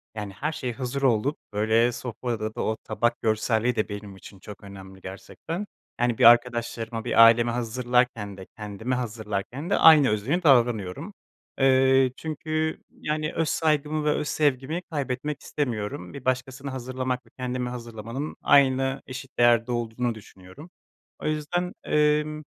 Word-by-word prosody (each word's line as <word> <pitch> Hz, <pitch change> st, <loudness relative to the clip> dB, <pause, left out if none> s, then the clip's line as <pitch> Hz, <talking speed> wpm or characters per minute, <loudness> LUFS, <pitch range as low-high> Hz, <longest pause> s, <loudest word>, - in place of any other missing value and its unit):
Yani, 105 Hz, -2 st, -5 dB
her 145 Hz, +10 st, -3 dB
şey 125 Hz, -6 st, -4 dB
hazır 130 Hz, +2 st, -4 dB
olup, 130 Hz, +2 st, +2 dB, 0.2 s
böyle, 110 Hz, +3 st, +3 dB
sofrada 115 Hz, -2 st, -4 dB
da -, -, -3 dB
o 110 Hz, -, -1 dB
tabak 120 Hz, 0 st, -1 dB
görselliği 110 Hz, +2 st, +1 dB
de 110 Hz, -1 st, -1 dB
benim 100 Hz, -1 st, -7 dB
için 95 Hz, 0 st, -14 dB
çok 105 Hz, +2 st, -11 dB
önemli, 95 Hz, -1 st, -11 dB
gerçekten. 160 Hz, -, -7 dB, 0.3 s
Yani, 120 Hz, -2 st, +1 dB
bir 130 Hz, -, +1 dB
arkadaşlarıma, 115 Hz, -1 st, +3 dB
bir 115 Hz, -, +6 dB
aileme 115 Hz, +1 st, +5 dB
hazırlarken 120 Hz, -3 st, 0 dB
de 95 Hz, -, -9 dB
kendime 110 Hz, +4 st, -3 dB
hazırlarken 115 Hz, -, -4 dB
de 200 Hz, -, +2 dB
aynı 155 Hz, -5 st, +7 dB
özeni 130 Hz, -, 0 dB
davranıyorum. 120 Hz, -, +2 dB, 0.5 s
Eee, 130 Hz, -1 st, +4 dB
çünkü, 155 Hz, 0 st, -3 dB
yani, 155 Hz, 0 st, -3 dB
öz 165 Hz, -2 st, 0 dB
saygımı 150 Hz, -1 st, 0 dB
ve -, -, +3 dB
öz 150 Hz, -, -1 dB
sevgimi 150 Hz, +3 st, 0 dB
kaybetmek 140 Hz, 0 st, -3 dB
istemiyorum, 105 Hz, -10 st, -4 dB
bir 140 Hz, -, -9 dB
başkasına 130 Hz, +1 st, -2 dB
hazırlamak 130 Hz, -1 st, -3 dB
ve 115 Hz, -, -22 dB
kendime 125 Hz, -1 st, -3 dB
hazırlamanın 120 Hz, +3 st, -6 dB
aynı 135 Hz, -1 st, +3 dB
eşit 135 Hz, +1 st, -9 dB
değerde 120 Hz, 0 st, +4 dB
olduğunu 120 Hz, 0 st, -2 dB
düşünüyorum. 100 Hz, -, -14 dB, 0.5 s
O -, -, -8 dB
yüzden, 155 Hz, +4 st, -2 dB
emm, 150 Hz, 0 st, +1 dB
125 Hz, 145 wpm, -25 LUFS, 110-140 Hz, 0.5 s, aynı